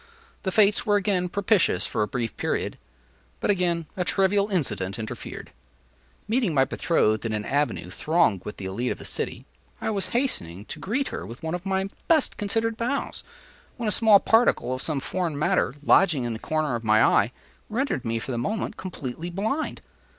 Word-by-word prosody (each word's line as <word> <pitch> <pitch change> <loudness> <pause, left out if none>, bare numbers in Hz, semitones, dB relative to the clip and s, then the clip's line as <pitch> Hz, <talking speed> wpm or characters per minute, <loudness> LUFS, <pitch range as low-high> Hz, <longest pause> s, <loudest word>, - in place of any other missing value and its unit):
The 190 - -2
fates 205 0 +4
were 205 - +2
again 190 -3 +1
propitious 200 - +2
for - - -1
a 105 - +2
brief 120 -2 -3
period; - - -2 0.6
but - - +2
again 175 -4 0
a 185 - 0
trivial 195 +3 +2
incident 105 - -1
interfered. 110 -1 -7 0.8
Meeting 220 - +1
my 135 -1 +5
betrothed 110 -9 +1
in 115 -1 -2
an 105 -1 -2
avenue 145 +1 -1
thronged 160 - +2
with 105 - -7
the 95 - -6
élite 110 +7 -2
of - - -3
the - - -10
city, - - -4 0.3
I - - -1
was 200 -2 -1
hastening 105 - -2
to - - -8
greet 260 +8 -1
her - - -5
with 120 +8 -10
one 160 +1 -2
of 180 +2 -4
my 190 0 0 0.2
best 315 -4 +3
considered 225 +2 -1
bows, 250 +5 -2 0.5
when 235 -3 -2
a - - +2
small 210 0 +6
particle 225 - +3
of 130 - -3
some 155 -4 -1
foreign 170 +1 -2
matter, 145 -3 +1
lodging 160 -5 +4
in 120 -1 -2
the 110 - -5
corner 155 -1 -1
of 115 -1 -3
my 110 0 +5
eye, 110 +4 +3 0.4
rendered 230 - -1
me, 115 -2 -1
for 115 - -4
the 120 - -1
moment, 205 - -2
completely 165 -3 -5
blind. 220 - -2
175 Hz, 185 wpm, -25 LUFS, -, 0.8 s, small